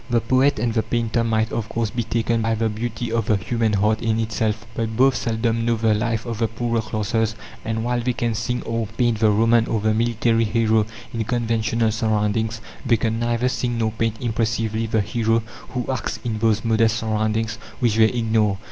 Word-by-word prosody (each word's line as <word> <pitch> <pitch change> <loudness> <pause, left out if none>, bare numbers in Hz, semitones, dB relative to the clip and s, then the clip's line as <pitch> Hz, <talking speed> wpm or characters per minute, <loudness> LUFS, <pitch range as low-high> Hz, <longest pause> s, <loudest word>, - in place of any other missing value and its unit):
The 120 -1 +3
poet 130 +5 +2
and 115 +1 0
the 110 - +2
painter 115 0 0
might, 110 -1 0
of 115 -1 -2
course, 115 -2 -1
be 120 - -1
taken 115 0 0
by 115 0 +1
the 110 0 0
beauty 115 +2 -4
of 115 -2 0
the 110 - +4
human 115 +2 0
heart 105 +2 +2
in 110 -1 +1
itself; 110 0 -1
but 110 -1 -3
both 130 0 +5
seldom 115 0 0
know 115 0 +2
the 110 -1 +2
life 115 +1 -1
of 115 -2 -4
the 115 - +2
poorer 115 +1 -1
classes, 110 +1 -1 0.3
and 110 0 -2
while 120 0 0
they 125 +1 0
can 120 -1 -1
sing 115 +3 -2
or 115 -1 -2
paint 115 0 0
the 110 -1 +4
Roman 115 +2 +3
or 110 - 0
the 110 +1 +1
military 115 0 +2
hero 110 -1 +2 0.3
in 115 -1 -1
conventional 115 -1 0
surroundings, 110 0 0 0.2
they 115 - +3
can 115 -1 -1
neither 120 +1 +1
sing 125 -1 -1
nor 110 -1 0
paint 115 0 -1
impressively 115 -1 -1
the 110 0 +1
hero 115 +1 0 0.3
who 125 -2 -3
acts 130 -5 -2
in 110 -2 -2
those 110 0 +1
modest 115 0 +3
surroundings 110 -1 -1 0.2
which 115 -4 +1
they 110 -1 +6
ignore. 110 -4 +1
115 Hz, 200 wpm, -22 LUFS, 110-115 Hz, 0.3 s, they